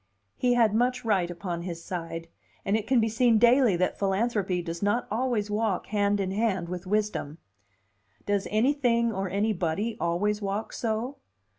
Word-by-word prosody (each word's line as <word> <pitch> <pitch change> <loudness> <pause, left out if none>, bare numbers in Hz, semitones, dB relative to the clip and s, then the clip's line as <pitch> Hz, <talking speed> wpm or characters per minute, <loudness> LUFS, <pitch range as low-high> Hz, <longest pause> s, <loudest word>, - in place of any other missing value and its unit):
He 245 -1 +2
had 225 -3 +4
much 245 +2 +1
right 190 -6 +2
upon 175 -1 -4
his 170 -1 -6
side; 165 -2 -5 0.4
and 200 - +2
it 220 -1 -2
can 260 -2 +4
be 225 - +2
seen 230 +1 +3
daily 240 -2 +5
that 180 +1 -1
philanthropy 195 -2 0
does 170 0 -5
not 205 +4 +1
always 220 -3 0
walk 210 -3 0
hand 205 -1 +1
in 190 -1 -1
hand 195 -4 0
with 180 +1 -6
wisdom. 205 -7 -1 0.9
Does 205 -1 0
anything 235 0 +2
or 190 -1 -2
anybody 200 +1 -1
always 205 +5 0
walk 200 +2 -3
so? 235 +4 -2
210 Hz, 160 wpm, -27 LUFS, 185-230 Hz, 0.9 s, daily